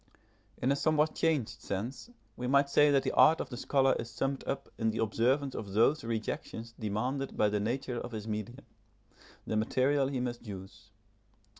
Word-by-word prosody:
In 130 - +1
a - - +3
somewhat 155 +1 +2
changed 155 -8 0
sense, 115 - -4 0.3
we 125 - -4
might 140 +1 +4
say 145 +1 +6
that 140 -2 +3
the - - 0
art 160 - +6
of - - -4
the - - -4
scholar 135 +1 +2
is 115 - -5
summed 135 +4 -2
up 135 - -3
in 110 -1 +2
the 110 - -3
observance 125 +5 +1
of 100 -3 -6
those 115 +8 +3
rejections 115 0 -4
demanded 125 +6 -2
by 105 - +4
the 105 0 0
nature 120 +3 -2
of 120 - -7
his 110 -1 -6
medium, 110 +5 -5 0.8
the - - -2
material 130 +5 +2
he 135 -2 -2
must 120 -1 -3
use. 100 +2 -9
125 Hz, 180 wpm, -31 LUFS, 110-140 Hz, 0.8 s, say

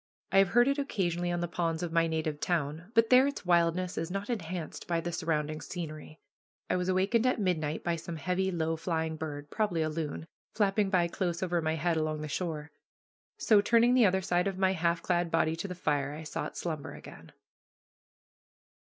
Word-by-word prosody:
I 195 - +5
have 195 - +5
heard 240 +7 +4
it 280 +1 +1
occasionally 175 -9 -1
on 175 0 -1
the 175 - -1
ponds 165 -1 -2
of 170 - -3
my 165 0 +3
native 160 -2 -2
town, 165 +3 -2
but 230 +1 +4
there 255 +2 +7
its 280 -8 -5
wildness 175 +1 +2
is 165 +1 -3
not 195 +5 -3
enhanced 175 -6 -5
by 170 -1 +1
the 175 +1 -3
surrounding 155 -2 -2
scenery. 155 -3 -7 0.5
I - - +2
was 180 0 -1
awakened 195 +6 +2
at 255 - +1
midnight 160 -6 -1
by 170 -1 0
some 165 +1 -6
heavy, 180 +4 -1
low 165 -2 -1
flying 160 -1 -2
bird, 145 -2 -6
probably 180 -7 0
a 155 - -1
loon, 155 0 -4 0.3
flapping 205 -1 +2
by 180 -3 +3
close 175 0 -2
over 175 -2 0
my 160 0 0
head 165 +1 0
along 155 -1 -1
the 155 - -4
shore. 155 -2 -4 0.7
So, 210 -2 +5
turning 235 +3 +4
the 245 -4 +6
other 190 0 +1
side 180 0 +1
of 195 -1 -3
my 190 0 +3
half 170 -1 0
clad 175 -1 +1
body 165 -1 +2
to 170 - -4
the 180 - -6
fire, 145 -5 -1
I 155 - -7
sought 155 - -5
slumber 155 -4 -4
again. - - -12
175 Hz, 200 wpm, -30 LUFS, 160-190 Hz, 0.7 s, there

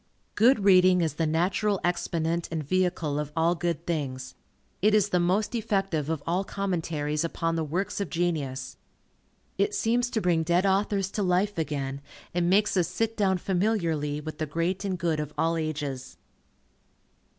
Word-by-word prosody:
Good 230 0 +4
reading 185 -2 +6
is 160 -3 0
the 160 +1 -1
natural 185 +5 +1
exponent 170 -1 -1
and 160 -2 -2
vehicle 170 -3 0
of 150 -1 -4
all 165 +1 +3
good 170 -1 -2
things. 135 -6 -3 0.5
It 210 +2 +4
is 210 -1 +3
the 180 - +2
most 185 +6 +1
effective 195 -9 -1
of 160 -3 -2
all 175 +4 0
commentaries 165 -6 -2
upon 165 0 -1
the 165 - 0
works 185 +7 -2
of 200 - -3
genius. 155 -7 -2 0.8
It 415 0 +1
seems 245 - +1
to 225 - -1
bring 175 -4 +2
dead 175 +3 +2
authors 195 0 +1
to 210 - -2
life 185 +1 +1
again, 140 -3 -3 0.3
and 175 0 +1
makes 205 +3 +3
us 180 -3 +2
sit 225 +3 -2
down 195 -4 +2
familiarly 175 -7 0
with 155 +1 -7
the 155 - -1
great 170 +6 -1
and 190 -2 -2
good 170 -3 0
of 150 -1 -5
all 165 +1 +1
ages. 145 -5 -4
175 Hz, 165 wpm, -27 LUFS, 155-195 Hz, 0.8 s, reading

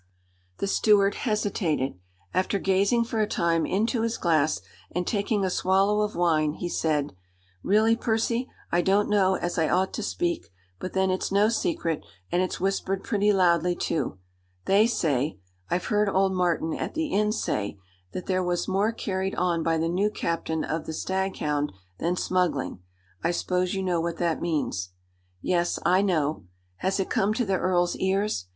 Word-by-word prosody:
The - - -1
steward 200 0 +4 0.2
hesitated. 185 - 0 0.4
After 185 +2 +1
gazing 195 +5 +2
for 230 -1 -3
a 210 - +2
time 165 -3 +1
into 225 +4 +1
his 230 0 -1
glass, 155 - +2 0.3
and 180 +1 -2
taking 205 0 0
a - - +1
swallow 195 +3 +2
of 210 0 -1
wine, 155 -3 +2
he 175 +2 -4
said: 150 - 0 0.5
"Really, 215 - +4
Percy, 230 +2 0 0.2
I 175 - +3
don't 200 +4 +2
know 190 -2 +4
as 175 -1 -2
I 160 - +2
ought 185 +1 +1
to - - -3
speak; 170 - -2 0.3
but 185 - -5
then 190 0 +2
it's 185 - -2
no 205 +2 +4
secret, 230 - -1 0.3
and 175 - +2
it's 185 - -2
whispered 195 0 -1
pretty 210 -1 +2
loudly, 175 -2 +3
too. 140 - -2 0.5
They 205 +3 +5
say 150 - 0 0.3
I've 180 - 0
heard 210 -1 +2
old 190 0 +2
Martin 175 -3 +1
at - - -4
the 315 -1 -1
inn 210 -2 +2
say 105 - -2 0.3
that 180 - -5
there 185 -1 0
was 175 -1 -1
more 195 +3 +2
carried 190 -4 -2
on 175 -2 +1
by 165 0 +1
the 165 +1 0
new 190 +5 +1
captain 165 -5 -2
of 155 +2 -3
the 160 - -3
Staghound 155 - -1 0.3
than 175 +2 0
smuggling. 175 - 0 0.4
I 165 - +2
s'pose 180 +1 0
you 190 - -1
know 175 -3 +1
what 170 0 -2
that 170 -2 0
means?" 140 - -2 0.5
"Yes. 175 -1 +1
I 185 +2 +4
know. 155 - 0 0.3
Has 190 - -1
it 195 - -2
come 205 +2 +2
to 245 - 0
the 195 -2 +1
earl's 175 -1 +1
ears?" 190 - 0
185 Hz, 170 wpm, -26 LUFS, 165-200 Hz, 0.5 s, They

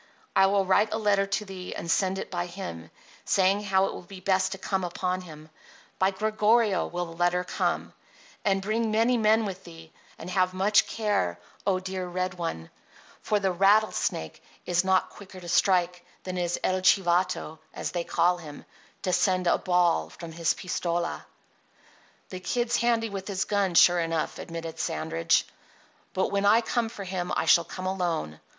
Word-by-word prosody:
I 195 0 +6
will 195 0 +2
write 205 +3 +3
a 220 - 0
letter 200 -2 +2
to 200 +2 -2
thee 185 -2 -7
and 170 - -3
send 190 +1 +1
it - - -6
by 175 -1 -2
him, 85 - -7 0.3
saying 195 +2 +2
how 190 -1 +3
it - - -3
will - - -7
be 185 +1 -11
best 190 0 +1
to - - -7
come 190 0 -2
upon 180 +1 -2
him. 155 -3 -12 0.5
By 190 - +4
Gregorio 215 0 +2
will 175 0 -3
the 165 -1 -10
letter 175 +1 +1
come. - - -2 0.5
And 195 -2 +1
bring 220 +2 0
many 225 +3 +3
men 220 -1 +3
with 190 -1 -6
thee, 165 -2 -13 0.3
and 165 - -9
have 185 -1 +1
much 200 +3 +3
care, 205 - -1 0.3
oh, 190 -2 +2
dear 185 0 -4
red 185 +1 -2
one, 165 - -5 0.5
for 210 - +1
the 195 -1 +1
rattlesnake 195 - +1 0.2
is 175 0 +2
not 190 -1 +2
quicker 190 -2 -12
to 175 - -10
strike 180 0 +2 0.2
than 185 -1 -5
is 175 -1 -1
'El 185 0 +1
Chivato,' 175 -4 +2
as - - -4
they 175 -1 -2
call 175 +1 +1
him, 150 -4 -10 0.4
to 185 - 0
send 185 +1 +2
a 175 - +3
ball 175 - +2
from 165 - -10
his 165 0 0
pistola." 175 -2 -3 1.0
"The 185 - -6
Kid's 240 +5 0
handy 230 -2 +1
with 195 -1 -6
his 195 -2 -1
gun, 200 -4 0
sure 175 +1 +6
enough," 165 -1 -2
admitted 165 -1 -7
Sandridge, 80 - 0 0.7
"but 190 - +1
when 200 0 +1
I 220 +3 +6
come 230 0 -1
for 205 -3 -8
him 185 -1 -4
I - - 0
shall 170 - +5
come 185 +3 -7
alone. 175 - -2
185 Hz, 180 wpm, -27 LUFS, 175-200 Hz, 1.0 s, I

